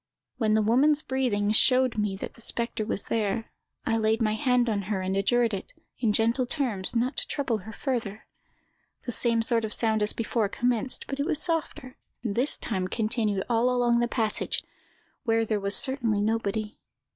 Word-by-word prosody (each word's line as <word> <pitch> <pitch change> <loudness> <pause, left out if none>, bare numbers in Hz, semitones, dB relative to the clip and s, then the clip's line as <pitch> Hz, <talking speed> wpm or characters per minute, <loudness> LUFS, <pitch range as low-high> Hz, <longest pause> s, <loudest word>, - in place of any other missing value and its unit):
When 215 -2 +2
the 220 - +3
woman's 285 +7 +3
breathing 230 -6 0
showed 255 +3 +4
me 210 -2 -1
the 190 - -6
spectre 230 -1 -3
was 200 - -2
there, 220 0 -2 0.3
I 225 - +1
laid 220 0 +2
my 215 -2 +1
hand 250 +1 +2
on 210 -3 0
her, 205 -3 0
and 190 +1 -2
adjured 230 +3 +2
it, 200 - -5 0.3
in 225 -4 +2
gentle 230 +4 +1
terms, 235 -8 0
not 245 +4 0
to - - -1
trouble 260 -6 -1
her 210 +3 -9
further. 220 -4 -3 0.8
The 245 - -4
same 230 -1 +2
sort 230 -1 +1
of 220 - -3
sound 220 -2 0
as 210 - +3
before 225 -2 -1
commenced, 245 +2 0
but 275 - -5
it 285 - 0
was 325 -4 0
softer, 315 -6 -2 0.3
and 220 -4 -1
this 250 +7 +1
time 190 -5 -2
continued 215 -2 0
all 235 +1 +2
along 240 -1 +2
the 240 - +2
passage, 225 -3 0 0.6
where 225 -2 +2
there 215 -1 0
was 200 0 +1
certainly 240 -6 +2
nobody. 215 0 -1
225 Hz, 180 wpm, -27 LUFS, 215-250 Hz, 0.8 s, showed